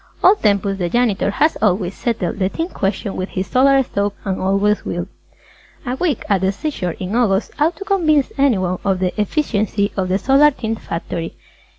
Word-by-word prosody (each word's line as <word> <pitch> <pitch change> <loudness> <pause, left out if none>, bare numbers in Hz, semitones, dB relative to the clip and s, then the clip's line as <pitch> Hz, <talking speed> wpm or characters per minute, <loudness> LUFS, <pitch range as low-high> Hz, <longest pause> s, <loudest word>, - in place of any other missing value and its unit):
Old 400 +3 +5
Tempus 200 -2 +1
the 175 -1 -1
Janitor 230 -2 +1
has 305 +10 +1
always 190 -3 +1
settled 210 -5 -2
the 190 -1 +1
Tint 330 - -4
question 195 +1 -2
with 185 +1 -3
his 185 0 -3
Solar 270 +3 +4
Stove 200 -4 -2
and 190 -1 -2
always 195 +2 +1
will. 175 0 -3 0.8
A 250 0 -2
week 300 -4 -1
at 200 -3 +2
the 190 0 +2
seashore 195 - -3
in 190 +3 -3
August 220 -4 +1
ought 315 +4 +2
to 395 - -8
convince 310 -8 +2
anyone 190 -10 +1
of 195 -1 +1
the 180 -1 -1
efficiency 210 -4 0
of 185 -2 -1
the 185 - +2
Solar 275 +8 +5
Tint 225 -5 -4
Factory. 165 0 -5
205 Hz, 185 wpm, -19 LUFS, 190-270 Hz, 0.8 s, Old